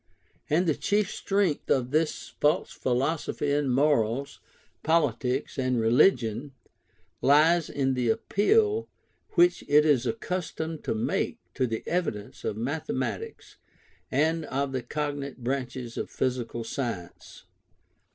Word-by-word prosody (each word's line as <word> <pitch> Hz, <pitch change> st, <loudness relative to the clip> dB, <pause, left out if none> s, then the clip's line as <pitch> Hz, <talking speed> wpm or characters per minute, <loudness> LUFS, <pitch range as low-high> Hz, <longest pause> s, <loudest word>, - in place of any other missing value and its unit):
And 165 Hz, +5 st, +3 dB
the 160 Hz, -, +3 dB
chief 205 Hz, +6 st, 0 dB
strength 195 Hz, -6 st, 0 dB
of 130 Hz, -1 st, +1 dB
this 155 Hz, +1 st, 0 dB
false 150 Hz, +1 st, +2 dB
philosophy 140 Hz, +3 st, -1 dB
in 145 Hz, -1 st, +1 dB
morals, 135 Hz, -1 st, +1 dB, 0.4 s
politics, 140 Hz, -4 st, 0 dB
and 130 Hz, -2 st, +1 dB
religion, 120 Hz, -, +3 dB, 0.7 s
lies 155 Hz, +4 st, +4 dB
in 135 Hz, -1 st, 0 dB
the 125 Hz, -2 st, 0 dB
appeal 425 Hz, -, +2 dB, 0.4 s
which 350 Hz, -2 st, +4 dB
it 150 Hz, +1 st, +5 dB
is 130 Hz, -5 st, +3 dB
accustomed 160 Hz, +3 st, -3 dB
to -, -, 0 dB
make 110 Hz, -, -1 dB, 0.2 s
to 130 Hz, -, 0 dB
the 115 Hz, -1 st, -3 dB
evidence 140 Hz, -, -3 dB
of 105 Hz, -, -2 dB
mathematics 140 Hz, -, -4 dB, 0.5 s
and 160 Hz, +4 st, +1 dB
of 140 Hz, +1 st, -2 dB
the 130 Hz, -1 st, -2 dB
cognate 140 Hz, 0 st, -4 dB
branches 125 Hz, -2 st, -3 dB
of -, -, -3 dB
physical 120 Hz, -2 st, -2 dB
science. 115 Hz, -, -6 dB
140 Hz, 120 wpm, -27 LUFS, 125-160 Hz, 0.7 s, it